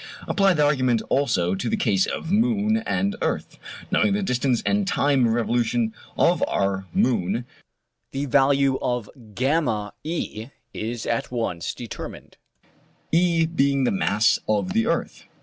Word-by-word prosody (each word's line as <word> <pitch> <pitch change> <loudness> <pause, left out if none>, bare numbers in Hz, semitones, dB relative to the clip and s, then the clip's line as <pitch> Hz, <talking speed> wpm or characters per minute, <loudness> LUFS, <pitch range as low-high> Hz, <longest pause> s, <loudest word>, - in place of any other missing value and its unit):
Apply 195 -2 +3
the 150 -1 +3
argument 130 -5 +2
also 95 -11 +1
to 95 +5 -2
the - - 0
case 95 -4 +2
of 165 - -4
moon 220 0 +2
and 200 +1 0
earth. - - -3 0.3
Knowing 205 - +3
the 205 0 0
distance 125 -6 0
and 205 -1 +1
time 140 -8 +2
of 115 - +1
revolution 120 -1 0 0.2
of - - +3
our 95 -1 -1
moon, 115 0 0 0.7
the 135 +1 -2
value 135 0 +3
of 120 -4 -2
VE 120 - -2 0.2
is 115 +1 -4
at 115 - -1
once 115 -9 -3
determined; - - -8 0.7
E 170 -1 +3
being 140 -4 +1
the 125 - +2
mass 100 +2 +2
of 145 - 0
the 225 +1 +1
earth. - - -2
130 Hz, 140 wpm, -24 LUFS, 110-165 Hz, 0.7 s, Apply